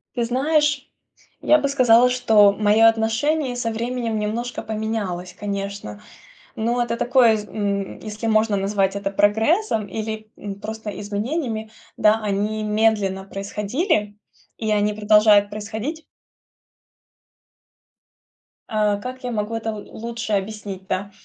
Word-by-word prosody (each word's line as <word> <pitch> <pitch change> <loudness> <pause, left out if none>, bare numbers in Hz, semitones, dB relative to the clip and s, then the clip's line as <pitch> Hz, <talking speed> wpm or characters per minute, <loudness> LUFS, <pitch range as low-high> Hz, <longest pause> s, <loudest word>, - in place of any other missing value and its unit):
Ты 240 - 0
знаешь, 290 +3 +1 0.5
я 305 - +5
бы 285 -2 0
сказала, 250 -3 +5
что 220 -5 +5
моё 215 +2 +4
отношение 245 +5 +1
со 230 -2 -2
временем 235 -1 -2
немножко 230 +4 -3
поменялось, 210 -5 -4
конечно. 200 - -5 0.5
Но 235 +2 0
это 235 -1 -2
такое, 240 -2 +4
из 210 -1 -4
м 200 -2 -3
если 215 +1 -6
можно 215 -1 +2
назвать 195 0 0
это 200 0 -2
прогрессом 220 - +2
или, 220 0 -5
м, 200 -1 -7
просто 220 0 -5
изменениями, 220 +2 -3 0.3
да, 215 +1 +4
они 210 +1 -1
медленно 210 -3 +1
происходили, 210 - -2 0.4
и 220 -1 -2
они 210 0 +2
продолжают 210 -1 +5
происходить. 220 +10 -5 2.6
А, 210 -1 +1
как 255 +5 -7
я 245 - -3
могу 215 +1 -2
это 225 0 -3
л 210 -1 -8
лучше 230 -1 -5
объяснить, 195 -1 -4
да? 200 +2 -3
215 Hz, 125 wpm, -22 LUFS, 205-235 Hz, 2.6 s, я